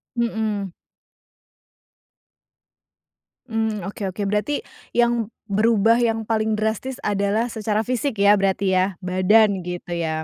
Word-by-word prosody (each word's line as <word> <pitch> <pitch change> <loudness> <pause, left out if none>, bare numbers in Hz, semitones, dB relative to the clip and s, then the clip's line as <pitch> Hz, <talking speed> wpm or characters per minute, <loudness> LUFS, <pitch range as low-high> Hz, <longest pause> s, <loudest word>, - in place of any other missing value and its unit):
Mhm. 220 -5 -1 2.8
Mmm, 220 -2 -1
oke 205 - -7
oke. 205 - -6
Berarti 210 +8 -1 0.3
yang 235 -2 +1 0.2
berubah 225 +2 +3
yang 225 -2 +1
paling 220 -1 +1
drastis 220 +4 -2
adalah 205 +3 0
secara 215 -1 -1
fisik 250 -1 -2
ya, 205 +1 +6
berarti 195 -1 +1
ya? 185 - +4 0.2
Badan 185 +1 +3
gitu 175 0 -6
ya? 160 -1 -2
215 Hz, 110 wpm, -22 LUFS, 195-225 Hz, 2.8 s, ya